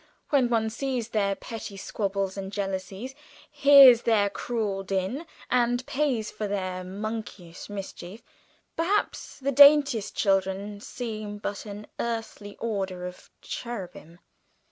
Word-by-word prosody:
When 265 -4 +3
one 220 -2 +1
sees 250 -2 -3
their 200 -3 +1
petty 215 -3 -8
squabbles 195 -1 -2
and 195 -1 -5
jealousies, 195 +4 -4 0.4
hears 280 -4 +8
their 210 -4 +2
cruel 210 -4 -2
din, 195 - -2 0.2
and 245 0 +2
pays 260 -7 -1
for 210 - -4
their 185 -2 -3
monkeyish 200 -3 -6
mischief, 200 +1 -8 0.5
perhaps 370 +6 -1
the 275 +1 -1
daintiest 280 -6 +6
children 195 +1 0
seem 215 -4 -5
but 205 +1 -5
an 205 +1 -7
earthly 225 -3 -4
order 190 -5 -3
of 180 0 -9
cherubim. 185 - -7
210 Hz, 120 wpm, -27 LUFS, 195-240 Hz, 0.5 s, hears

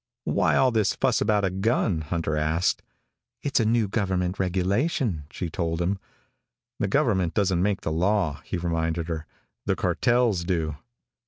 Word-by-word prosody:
"Why - - +2
all 130 -1 +4
this 110 -4 +1
fuss - - +1
about 105 -2 +2
a 95 - 0
gun?" 95 -3 +1
Hunter 80 0 -2
asked. 80 +3 +1 0.6
"It's 145 - +1
a 115 - +2
new 115 -1 +2
government 95 -3 -1
regulation," 95 - 0
she 90 - -4
told 85 -1 -2
him. 95 +3 0 0.8
"The - - +1
government 90 -3 +1
doesn't 95 -4 +2
make 100 +1 +1
the - - -2
law," 90 -2 +1
he - - -3
reminded 85 -1 -1
her. 80 -1 -4 0.4
"The - - +2
cartels 120 -7 +2
do." 80 -4 -1
90 Hz, 155 wpm, -25 LUFS, 80-105 Hz, 0.8 s, all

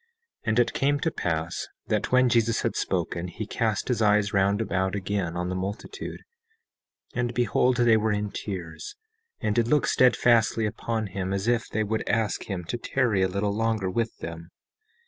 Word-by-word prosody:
17:5 465 - -41 0.4
And 110 +2 +3
it 120 -1 +2
came 145 +1 +1
to 160 - 0
pass 85 - -2 0.2
that - - -1
when 130 0 +5
Jesus 115 -1 +2
had - - 0
thus - - -2
spoken, 85 +1 -2
he 100 +5 -6
cast 110 -1 -1
his 125 -3 0
eyes 105 -1 +3
round 100 +1 +3
about 95 -3 0
again 95 -3 -2
on 90 0 -2
the - - -2
multitude, 100 - -5 0.9
and 120 -1 -1
beheld 125 +1 +2
they 120 -2 +5
were 110 0 +1
in 105 0 -1
tears, 85 -7 -6 0.5
and 105 - +1
did 115 +1 +2
look 150 +3 +3
steadfastly 115 -3 +4
upon 110 +1 -2
him 95 -1 -4
as 100 +2 -2
if 120 -1 +1
they 110 - -1
would 110 +1 -2
ask 115 -3 0
him 95 -3 -3
to 85 +8 -4
tarry 120 -6 +1
a 95 - +4
little 100 +2 -1
longer 110 -4 0
with 115 +3 -1
them. 85 0 -7
105 Hz, 185 wpm, -26 LUFS, 95-115 Hz, 0.9 s, when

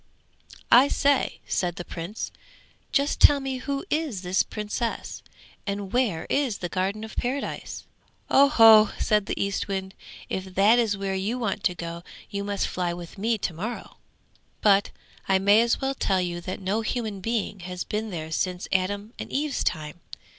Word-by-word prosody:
'I 250 +4 +8
say,' 280 -1 +1
said 175 -2 -1
the 175 - -6
Prince, 175 +6 -5 0.6
'just 280 0 +1
tell 290 -1 +7
me 270 -1 -3
who 275 +4 -3
is 295 - -1
this 180 +1 +2
Princess, 215 +2 -4 0.5
and 200 -1 -4
where 230 -10 +1
is 265 -8 0
the 175 - -4
Garden 195 +4 -2
of 220 - -8
Paradise?' 265 +3 -3 0.4
'Oh 280 +1 +6
ho!' 225 -5 +8
said 210 -2 +1
the - - -3
Eastwind, 195 -1 -2 0.3
'if 190 0 -5
that 210 +5 +5
is 215 -4 +1
where 195 -1 -2
you 200 +6 -1
want 215 -4 -2
to 180 - +2
go 170 -1 -6 0.3
you 200 -1 -3
must 200 -1 -1
fly 180 -1 -2
with 175 +2 -9
me 225 +2 +1
to 190 - -3
morrow. 215 +9 -6 0.6
But 200 -1 +4 0.4
I 190 - +5
may 200 +3 +5
as 235 0 +1
well 270 0 -1
tell 195 -7 +1
you 175 -1 -2
that 185 +2 -5
no 200 +3 -1
human 220 -3 -3
being 210 -1 -2
has 180 0 -5
been 215 +1 -3
there 160 -4 -5
since 180 +3 -2
Adam 200 +4 -1
and - - -6
Eve's 290 0 -1
time. 155 0 -3
200 Hz, 170 wpm, -26 LUFS, 185-235 Hz, 0.6 s, I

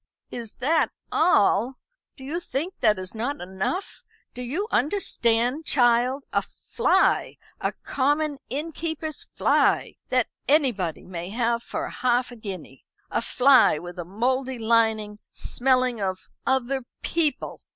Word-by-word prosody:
"Is 230 -3 -6
that 315 +5 +2 0.2
all? 250 - +3 0.4
Do 265 - -11
you 300 +6 -3
think 340 +2 -3
that 215 -3 +3
is 185 0 -6
not 245 +6 -3
enough? 190 - -4 0.3
Do 250 - -6
you 305 - -2
understand, 250 - +1
child? 250 +1 +3
a - - +3
fly 470 - +1 0.2
a - - -1
common 290 +1 0
innkeeper's 315 +2 -4
fly - - +2
that 255 -2 +3 0.2
anybody 245 - +1
may 175 -1 -6
have 235 +2 0
for 320 +7 -4
half 250 -3 0
a - - -9
guinea; 190 - -8 0.3
a - - +1
fly 255 - +5
with 175 +2 -8
a - - -2
mouldy 255 +8 -1
lining, 220 -2 +2
smelling 255 -3 +1
of 190 -1 -3 0.2
other 265 0 +1 0.2
people! 320 -3 0
250 Hz, 130 wpm, -25 LUFS, 220-285 Hz, 0.4 s, fly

